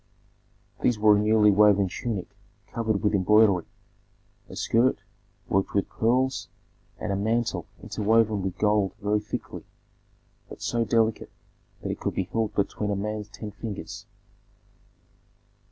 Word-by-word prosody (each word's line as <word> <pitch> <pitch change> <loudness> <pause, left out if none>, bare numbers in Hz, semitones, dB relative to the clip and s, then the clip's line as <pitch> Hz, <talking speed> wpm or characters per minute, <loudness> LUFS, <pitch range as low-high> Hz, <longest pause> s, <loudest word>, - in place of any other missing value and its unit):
These 120 - +2
were 105 0 +5
a - - +2
newly 105 0 +4
woven 100 -1 +5
tunic 100 0 -5 0.4
covered 110 -3 -1
with 105 0 +2
embroidery, 100 -2 +4 0.8
a - - -9
skirt 115 +6 +1 0.4
worked 95 +1 0
with 100 - +1
pearls, 130 +4 0 0.5
and 105 - -3
a - - 0
mantle 115 +4 -1 0.2
interwoven 110 -1 +2
with 95 -1 -4
gold 105 -2 +1
very 105 0 +1
thickly, 105 - -6 0.9
but - - -10
so 120 -1 0
delicate 115 -1 +1 0.5
that - - -2
it - - -5
could - - -3
be 95 - 0
held 110 +2 -2
between 105 +1 -1
a 100 - 0
man's 105 +1 -4
ten 105 0 -8
fingers. 105 0 -7
105 Hz, 135 wpm, -26 LUFS, 100-110 Hz, 0.9 s, were